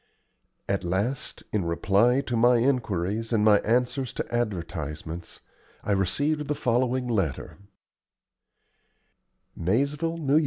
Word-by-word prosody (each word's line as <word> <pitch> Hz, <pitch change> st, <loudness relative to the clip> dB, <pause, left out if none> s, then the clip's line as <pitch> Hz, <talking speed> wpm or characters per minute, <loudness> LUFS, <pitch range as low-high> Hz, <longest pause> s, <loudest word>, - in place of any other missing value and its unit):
At 100 Hz, -1 st, -1 dB
last, 100 Hz, +10 st, -2 dB
in 105 Hz, -3 st, +1 dB
reply 100 Hz, +9 st, +2 dB
to 125 Hz, -3 st, -3 dB
my 120 Hz, +2 st, +5 dB
inquiries 115 Hz, -4 st, 0 dB
and 110 Hz, -2 st, +2 dB
my 105 Hz, -2 st, +6 dB
answers 125 Hz, +3 st, 0 dB
to -, -, -5 dB
advertisements, 85 Hz, -6 st, -4 dB, 0.4 s
I -, -, -2 dB
received 145 Hz, -, +1 dB
the 150 Hz, -, -1 dB
following 125 Hz, 0 st, 0 dB
letter: 95 Hz, -, -2 dB, 2.0 s
Maizeville, 140 Hz, -, 0 dB
N.Y. 150 Hz, -1 st, +3 dB
115 Hz, 110 wpm, -26 LUFS, 95-130 Hz, 2.0 s, my